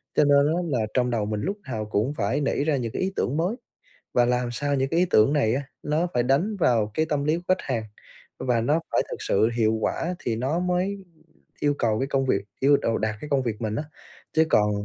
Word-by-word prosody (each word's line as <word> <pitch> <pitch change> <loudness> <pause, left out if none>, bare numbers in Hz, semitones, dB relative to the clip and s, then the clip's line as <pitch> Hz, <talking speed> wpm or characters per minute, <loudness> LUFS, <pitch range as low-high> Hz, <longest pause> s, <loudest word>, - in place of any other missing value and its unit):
cho - - +5
nên 140 0 +5
á 175 - 0 0.2
là 110 - -1
trong 125 -1 +2
đầu 115 -3 0
mình 105 0 -2
lúc 200 +2 -2
nào 110 -2 -2
cũng 110 +6 0
phải 150 - -1
nảy 140 0 0
ra 155 -1 +1
những 120 -3 -3
cái - - -3
ý 190 +1 -1
tưởng 140 - -1
mới, 180 +7 0 0.6
và 120 - +4
làm 125 0 0
sao 145 +4 -1
những 135 0 0
cái 165 - +1
ý 180 - +4
tưởng 110 +7 +5
này 125 -7 +2
á 135 - -1 0.2
nó 155 +4 0
phải 120 - +2
đánh 145 - +1
vào 115 - +2
cái 155 +6 +1
tâm 145 -2 0
lý 155 +2 +2
của 175 - -8
khách 185 0 +1
hàng, 115 - -2 0.6
và 120 -3 +1
nó 150 +8 +1
phải - - +3
thực - - -4
sự 110 +3 +2
hiệu 110 -1 +3
quả 165 +10 -1
thì 115 - -2
nó 135 +9 -1
mới 180 +2 -1 0.6
yêu 145 0 +2
cầu 110 -2 +1
cái 135 - -1
công 135 -1 0
việc 100 -6 +1 0.2
yêu 140 +1 +5
đầu 115 -4 0
đạt 110 0 -1
cái 150 - -7
công 135 -2 +2
việc 115 -3 -3
mình 110 -1 -2
á. 145 - -2 0.5
Chứ 160 0 +4
còn 105 -6 +3
135 Hz, 250 wpm, -25 LUFS, 115-155 Hz, 0.6 s, cho